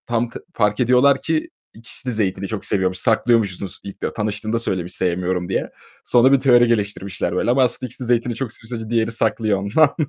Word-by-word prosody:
Tam 120 0 0
tı - - -10
fark 105 -1 +1
ediyorlar 130 +3 +4
ki 160 -1 -1 0.2
ikisi 115 +3 -3
de - - 0
zeytini 100 -3 -1
çok 110 0 -4
seviyormuş, 95 -2 0
saklıyormuşsunuz 105 -3 +1
ilk 100 - -10
de - - -3
tanıştığında 110 +1 -2
söylemiş, 90 -5 -2
sevmiyorum 90 0 -1
diye. 95 - -1 0.4
Sonra 125 +2 +4
bir 140 - +5
teori 120 -2 +5
geliştirmişler 100 -5 -2
böyle, 120 - +1
ama 130 +1 +4
aslında 125 +1 -1
ikisi 125 - -5
de - - -6
zeytini 120 0 +1
çok 125 -3 -4
seviyor, 110 - -9
sadece 110 - -8
diğeri 115 0 +1
saklıyor 110 -3 0
ondan. 140 +10 +2
110 Hz, 195 wpm, -20 LUFS, 100-120 Hz, 0.4 s, bir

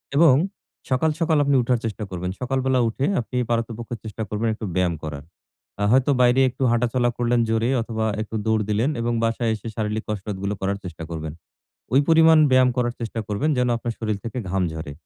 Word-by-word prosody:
এবং 155 -2 +7 0.6
সকাল, 130 +5 +2
সকাল 160 -2 +2
আপনি 140 0 +2
উঠার 120 0 +1
চেষ্টা 110 -1 -3
করবেন। 90 0 -4
সকালবেলা 130 0 +1
উঠে 130 +5 -2 0.2
আপনি 125 +2 -5
পারতপক্ষে 115 0 -2
চেষ্টা 110 0 -5
করবেন 105 +2 -1
একটু 110 - -6
ব্যায়াম 90 -2 +2
করার। 75 -2 -6 0.5
অ্যাঁ 100 0 +1
হয়তো 130 +3 +4
বাইরে 125 +2 +5
একটু 130 - -4
হাঁটাচলা 120 +1 +1
করলেন 120 0 +1
জোরে 115 +1 +1
অথবা 110 -1 -2 0.2
একটু 110 +1 -6
দৌড় 110 -1 +2
দিলেন 110 +6 +1
এবং 120 +1 0
বাসায় 115 0 0
এসে 110 +1 -9
শারীরিক 110 0 -2
কসরতগুলো 100 -1 -3
করার 100 +1 -1
চেষ্টা 85 -3 -7
করবেন। 80 -2 -5 0.6
ওই 135 - +7
পরিমাণ 160 0 +6
ব্যায়াম 130 0 +5
করার 120 -1 0
চেষ্টা 115 0 -3
করবেন 105 +9 0
যেন, 125 0 +2
আপনার 115 0 -3
শরীর 110 -2 -1
থেকে 115 +3 -4
ঘাম 95 +1 +1
ঝরে। 80 -2 -6
115 Hz, 185 wpm, -23 LUFS, 105-125 Hz, 0.6 s, এবং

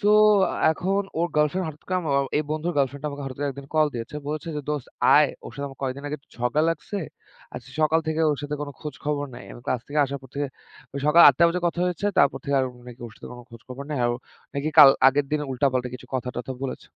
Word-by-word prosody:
So 205 - +3 0.6
এখন 195 +5 0 0.2
ওর 170 +1 +1
girlfriend 150 +5 +1
হঠাৎ 155 0 -10
করে 185 - +1
আমার 155 -5 -2
এ 135 0 -2
এই 155 - -1
বন্ধুর 155 +3 -1
গার্লফ্রেন্ড 140 +1 -1
আমাকে 145 0 -6
হঠাৎ 130 -2 -7
করে 145 - 0
একদিন 140 +1 -9
কল 155 -1 +4
দিয়েছে। 120 +5 -5
বলেছে 155 +2 -4
যে - - -2
দোস্ত 150 -4 -2 0.3
আয়, 150 -2 +6 0.2
ওর - - -8
সাথে 140 0 -4
আমার 135 - -14
কয়েকদিন 135 +1 -3
আগে 150 - -3
একটু - - -37
ঝগড়া 125 +5 +1
লাগছে। 200 +6 -4 0.6
আজকে - - -9
সকাল 155 +1 +3
থেকে 160 0 -1
ওর 145 - -2
সাথে 145 0 -3
কোন 145 - -5
খোঁজ 150 -3 -6
খবর 145 -1 -1
নাই। - - -10
আমি - - -11
ক্লাস 125 - 0
থেকে 150 +1 -2
আসার 140 +1 -4
পর 130 - -13
থেকে 145 0 -1 0.5
ওই 140 - -3
সকাল 165 +3 +7
৮ঃ০০ 140 - +5
টা 170 - +6
বাজে 180 +2 -1
কথা 170 0 -1
হয়েছে, 180 +3 -2
তারপর 140 -1 +4
থেকে 140 -1 0
আর - - +1 0.2
নাকি 120 0 -12
ওর 110 - -12
সাথে - - -10
কোন 125 - -10
খোঁজ 115 -1 -13
খবর 130 +2 -7
নাই। 145 - -2
আর - - +3
ও - - -4 0.4
নাকি 140 +2 -1
কাল 145 -2 +12 0.2
আগের 140 +1 0
দিন 150 - +1
উল্টাপাল্টা 130 -1 0
কিছু 125 - -10
কথা-টথা 125 0 -3
বলেছে। 135 - -6
145 Hz, 250 wpm, -24 LUFS, 135-155 Hz, 0.6 s, কাল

